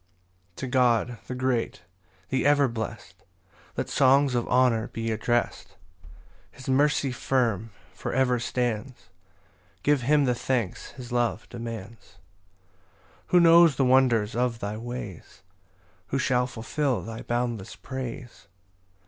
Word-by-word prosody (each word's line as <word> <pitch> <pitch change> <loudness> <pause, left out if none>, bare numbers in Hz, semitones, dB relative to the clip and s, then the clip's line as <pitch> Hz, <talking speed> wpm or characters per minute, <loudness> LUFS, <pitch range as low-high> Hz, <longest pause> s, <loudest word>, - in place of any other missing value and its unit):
1 - - -40
To 135 - -5
God, 125 -2 +2
the 125 - -4
great, 125 -6 -1 0.5
the 130 - 0
ever 145 -1 +4
blest, 110 -3 -7 0.5
Let - - -1
songs 135 0 +4
of 120 -1 0
honour 120 -2 +3
be 115 0 -4
addrest: 120 +2 -1 0.7
His 130 - -13
mercy 140 0 +2
firm 120 -5 0 0.2
for - - -5
ever 125 -1 +2
stands; 120 -4 -3 0.7
Give 145 -2 +3
him 145 +3 +3
the 125 - +2
thanks 120 -4 -2
his 125 -2 -10
love 120 -2 0
demands. 115 -2 -8 1.2
2 180 - +4
Who - - +8
knows 170 -2 +7
the 135 - +2
wonders 125 -5 +3
of 120 -1 0
thy 105 -1 -4
ways? 115 -6 -8 0.6
Who 135 - -1
shall 125 -2 +1
fulfil 130 +3 -2
thy 115 0 -7
boundless 120 -4 -3
praise? 125 -5 -7
125 Hz, 130 wpm, -26 LUFS, 115-130 Hz, 1.2 s, Who